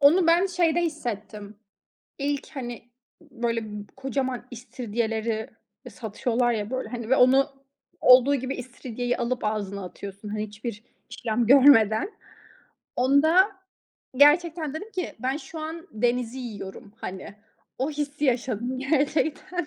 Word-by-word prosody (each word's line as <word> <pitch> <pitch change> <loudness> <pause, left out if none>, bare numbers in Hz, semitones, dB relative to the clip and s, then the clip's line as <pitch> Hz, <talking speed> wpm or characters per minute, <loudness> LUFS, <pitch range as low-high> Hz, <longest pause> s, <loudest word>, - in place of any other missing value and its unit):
Onu 330 +5 +6
ben 345 +3 +5
şeyde 345 -2 +1
hissettim. 215 -9 -5 0.6
İlk, 285 0 -2
hani, 240 -3 -6 0.4
ı - - -19
böyle, 230 -1 -1
b 210 -1 -7
kocaman 265 -2 -3
istiridyeleri 225 -2 -3 0.4
e - - -7
satıyorlar 230 +4 -1
ya 210 -1 -3
böyle, 260 0 -3
hani, 235 -2 -6
ve 265 - +5
onu 265 +2 +5 0.5
olduğu 255 +3 +7
gibi 260 +1 -3
istiridyeyi 245 -1 -4
alıp 245 +1 -2
ağzına 200 -2 -2
atıyorsun, 200 +3 -9
hani, 215 +1 -3
hiçbir 215 +1 -7 0.3
işlem 225 +1 -1
görmeden. 265 - +6 0.8
Onda 315 - +4 0.7
gerçekten 310 +1 +4
dedim 410 +8 -6
ki 365 - -4
"Ben 260 +2 -1
şu 320 +1 -9
an 320 +2 -6
denizi 240 +2 0
yiyorum," 205 -4 -8
hani, 190 +2 -7 0.4
o 265 +4 0
hissi 295 0 -3
yaşadım 250 -1 0
gerçekten. 300 +4 0
250 Hz, 130 wpm, -26 LUFS, 220-290 Hz, 0.8 s, olduğu